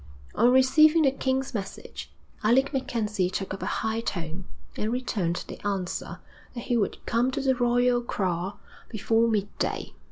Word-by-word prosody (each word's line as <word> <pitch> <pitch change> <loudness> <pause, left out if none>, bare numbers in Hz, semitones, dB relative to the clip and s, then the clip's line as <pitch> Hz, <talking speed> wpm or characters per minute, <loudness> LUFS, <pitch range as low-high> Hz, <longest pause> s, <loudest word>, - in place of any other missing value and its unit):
On 235 - +4
receiving 305 +5 +5
the 270 - +4
king's 265 0 -1
message, 200 -4 -6 0.3
Alec 265 +6 +3
MacKenzie 210 -8 -1
took 190 0 -3
up 190 - -7
a - - -3
high 220 +1 -1
tone, 175 -5 -4 0.3
and 215 +1 -2
returned 210 -9 -2
the - - -9
answer 195 -3 -3 0.4
that 240 - -4
he 245 - 0
would 210 -4 0
come 235 +3 +2
to 260 - -3
the 270 -1 +2
royal 245 0 +2
kraal 185 -4 -2 0.3
before 225 +1 +2
midday. 205 -3 -2
230 Hz, 155 wpm, -26 LUFS, 200-255 Hz, 0.4 s, receiving